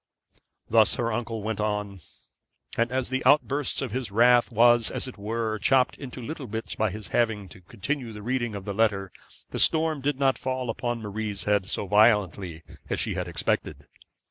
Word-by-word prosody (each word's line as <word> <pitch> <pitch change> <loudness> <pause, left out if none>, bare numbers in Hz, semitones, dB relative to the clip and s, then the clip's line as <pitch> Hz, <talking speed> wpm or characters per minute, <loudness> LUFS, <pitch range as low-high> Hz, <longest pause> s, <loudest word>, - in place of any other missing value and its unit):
Thus 110 -2 +5
her 115 -2 -1
uncle 115 -1 -3
went 110 0 -3
on; 105 -2 -2 0.8
and 115 +1 +1
as 130 0 -1
the 130 0 -1
outburst 140 0 +2
of 130 - -4
his 125 -1 -3
wrath 120 +4 +4
was, 120 0 +4
as - - -3
it 130 - -8
were, 110 +1 -3
chopped 130 +3 +3
into 130 -2 -8
little 145 0 -6
bits 110 +1 -4
by 110 - 0
his 105 0 -8
having 110 -4 0
to 95 - -14
continue 120 +7 -4
the 105 -1 -9
reading 120 -2 -1
of 100 -1 -7
the 100 - -3
letter, 100 -3 +1 0.4
the - - -3
storm 160 -2 +3
did 145 0 0
not 135 -1 +2
fall 130 -2 -2
upon 120 0 -3
Marie's 105 -1 -3
head 105 -2 +1
so 105 - -1
violently 100 -5 +2 0.3
as - - -1
she - - -1
had - - -3
expected. - - -2
115 Hz, 185 wpm, -26 LUFS, 105-130 Hz, 0.8 s, Thus